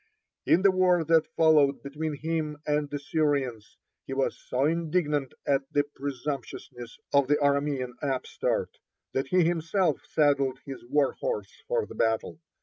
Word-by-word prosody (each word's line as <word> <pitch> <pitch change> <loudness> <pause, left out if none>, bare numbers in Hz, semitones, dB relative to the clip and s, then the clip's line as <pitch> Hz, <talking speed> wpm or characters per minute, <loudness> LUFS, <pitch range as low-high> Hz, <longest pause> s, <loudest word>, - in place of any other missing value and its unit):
(34) - - +6
In 180 - 0
the 195 - +6
war 180 -2 +3
that 160 0 +3
followed 150 -4 +4
between 150 +2 -4
himself 155 0 -3
and 150 -1 0
the 145 - -3
Syrians, 140 -7 -1 0.3
he 135 - -4
was 135 - 0
so 130 +2 -1
indignant 155 -4 0
at 135 -1 0
the 145 - +3
presumptuousness 135 -3 -6 0.2
of 140 -2 +4
the 145 - +4
Aramean 140 -3 +1
upstart 135 -3 -2 0.3
that 135 0 -1
he 180 +4 +3
himself 165 0 +1
saddled 140 -4 +2
his 135 -2 -8
warhorse 150 - -1
for 485 -2 0
the - - -11
battle. 110 +7 -1
145 Hz, 145 wpm, -27 LUFS, 135-160 Hz, 0.3 s, 34